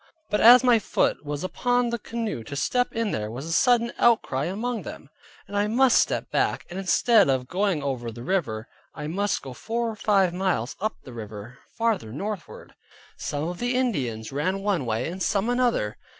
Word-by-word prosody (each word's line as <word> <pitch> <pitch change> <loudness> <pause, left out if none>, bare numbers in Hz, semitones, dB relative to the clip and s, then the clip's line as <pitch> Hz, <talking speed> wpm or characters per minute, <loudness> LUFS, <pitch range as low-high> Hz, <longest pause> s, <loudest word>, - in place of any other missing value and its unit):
But 210 - +1
as 245 +2 +9
my 245 -3 +5
foot 195 - 0
was 145 +1 -4
upon 245 +5 0
the 235 - -2
canoe 225 - -4
to 140 - -7
step 245 - 0
in 225 -2 -1
there 105 -1 -3
was 125 +6 -6
a 165 - -5
sudden 240 +4 +3
outcry 185 - +3
among 225 +5 -2
them, 145 -3 -10 0.4
and 200 - -8
I 205 +1 +2
must 245 +3 +4
step - - 0
back, - - 0
and 185 - -4
instead 205 - +4
of 130 -2 0
going 185 -3 0
over 125 -4 -3
the 120 +2 -9
river, 120 - -1 0.3
I 150 - -6
must 200 +6 -1
go 135 - -7
four 230 - -2
or - - -8
five 195 -4 +2
miles 180 -9 -1
up 215 +1 -1
the 130 - -11
river 110 +2 -9 0.2
farther 225 - 0
northward. 200 - -6 0.4
Some 145 0 -3
of 175 0 -5
the 245 +1 -1
Indians 130 - -1
ran 185 +8 -1
one 190 -11 0
way, 115 +2 -1
and 180 +3 -6
some 205 +5 +1
another. 245 - 0
190 Hz, 195 wpm, -25 LUFS, -, 0.4 s, as